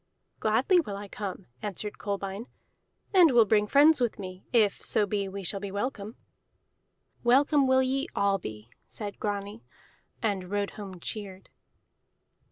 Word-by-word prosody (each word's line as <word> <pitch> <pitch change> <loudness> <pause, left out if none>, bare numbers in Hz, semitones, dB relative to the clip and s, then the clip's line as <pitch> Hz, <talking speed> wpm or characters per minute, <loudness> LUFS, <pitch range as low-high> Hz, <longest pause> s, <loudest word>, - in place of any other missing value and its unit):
"Gladly 240 - +3
will 210 -12 -3
I 205 0 -7
come," 195 -2 -6 0.2
answered 205 +1 -5
Kolbein, 200 +2 -4 0.7
"and 360 -4 +7
will 240 -4 +6
bring 210 0 +3
friends 290 +3 +5
with 240 -2 0
me, 185 -2 -8
if 215 -5 +2
so 210 - +2
be 200 -1 -2
we 195 +1 -6
shall 195 +3 0
be 200 0 -5
welcome." 210 0 -4 1.1
"Welcome 275 +3 +4
will 260 0 +4
ye 270 +3 -1
all 200 -1 +2
be," 110 -5 -9 0.2
said 205 -2 -6
Grani, 205 +1 -4 0.6
and 195 -5 -2
rode 205 0 -1
home 195 -4 -9
cheered. 195 0 -7
205 Hz, 145 wpm, -28 LUFS, 195-240 Hz, 1.1 s, and